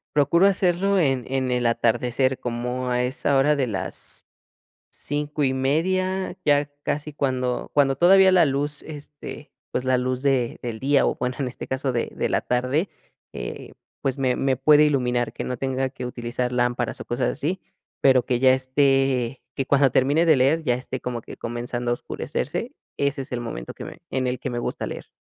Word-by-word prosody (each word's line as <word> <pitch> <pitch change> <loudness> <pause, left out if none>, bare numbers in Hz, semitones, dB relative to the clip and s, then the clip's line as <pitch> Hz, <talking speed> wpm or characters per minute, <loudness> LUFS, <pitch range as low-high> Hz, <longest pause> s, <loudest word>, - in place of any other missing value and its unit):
Procuro 150 +6 +4
hacerlo 195 0 +2
en 135 -6 +1
en 130 -1 0
el 125 -1 0
atardecer 120 +3 +1
como 125 +1 -3
a 125 0 +1
esa 135 +2 0
hora 150 +2 +4
de 135 - +1
las 95 -3 -6 0.6
5 145 0 -3
y 130 - +2
media 185 +8 0
ya 145 0 +3
casi 150 +1 -2
cuando 130 -3 -1
cuando 135 -2 +3
todavía 190 +2 +6
la 175 -3 +6
luz, 145 +1 -1
este, 145 -1 -9 0.2
pues 125 - -1
la 130 0 +2
luz 130 0 -1
de 130 -4 +1
del 115 -3 -4
día 140 +1 +3
o - - 0
bueno 125 0 -2
en 130 -3 -1
este - - -8
caso 130 0 -1
de 120 -1 -2
de - - -1
la - - +2
tarde, 130 +9 0 0.5
eh - - -7 0.3
pues 135 0 -1
me 130 -2 +1
me 135 -1 +1
puede 150 +3 +5
iluminar 125 -4 0
que - - -5
no 125 -1 -3
tenga 130 0 -1
que 125 -1 -7
utilizar 125 0 -3
lámparas 120 -1 0
o - - -8
cosas 120 +1 0
así, 160 +7 -2 0.4
pero 130 -2 +4
que 125 -2 0
ya 130 0 +6
esté 130 -1 +1
que 135 - -1
cuando 140 -1 +4
termine 145 +7 +3
de 155 -4 +5
leer 145 +6 +3
ya 125 -5 +2
esté 130 +1 -6
como 120 -1 -3
que - - -10
comenzando 120 +1 -3
a - - +4
oscurecerse, - - -4 0.2
ese 140 -1 -1
es 130 - -10
el 120 - -2
momento - - -6
que - - -9
me - - -10
en 130 -1 -1
el 125 0 -1
que 130 - -4
me 120 0 -3
gusta - - -3
leer. - - -8
130 Hz, 195 wpm, -24 LUFS, 125-145 Hz, 0.6 s, todavía